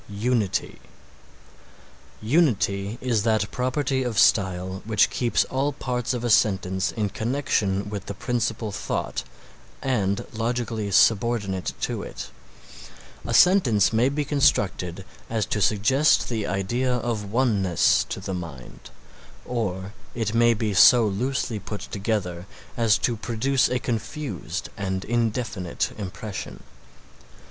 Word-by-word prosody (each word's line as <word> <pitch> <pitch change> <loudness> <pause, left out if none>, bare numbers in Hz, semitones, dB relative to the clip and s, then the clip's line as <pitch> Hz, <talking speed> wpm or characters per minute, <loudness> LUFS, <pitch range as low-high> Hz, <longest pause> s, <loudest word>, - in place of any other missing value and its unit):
UNITY 105 0 -1 1.4
Unity 110 - +1
is 120 -4 +1
that 110 -1 +1
property 130 +1 -1
of 120 -4 -3
style 95 -3 +2
which 110 -1 +2
keeps 120 -2 +1
all 135 +2 -1
parts 125 -3 -2
of 120 - -4
a 120 - 0
sentence 95 -4 +2
in 105 -2 -1
connection 110 -4 -1
with 100 -2 -6
the 100 - -5
principal 115 -1 -2
thought - - -3 0.6
and 100 -7 0
logically 115 -2 -2
subordinate 100 -2 +2
to - - -2
it. 60 - -8 1.0
A 115 - -2
sentence 125 - +5
may 120 +4 +3
be 145 +1 -2
constructed 95 - +1 0.2
as 110 -3 0
to 105 - -2
suggest 120 - +3
the 110 -4 -2
idea 120 +7 0
of 115 -4 -3
oneness 105 - +2
to - - -4
the 95 - -5
mind, 80 -8 -8 0.6
or 100 -5 -3 0.2
it 115 -3 -2
may 115 0 +4
be 105 -1 -1
so 120 +4 +7
loosely 115 +2 -1
put 105 +1 -6
together 95 -4 -3 0.3
as 115 -2 +3
to 120 - 0
produce 120 +4 +1
a 125 - +1
confused 120 - -4
and 95 -1 -3
indefinite 115 -5 -1
impression. 95 +1 -6
110 Hz, 120 wpm, -24 LUFS, 100-125 Hz, 1.4 s, so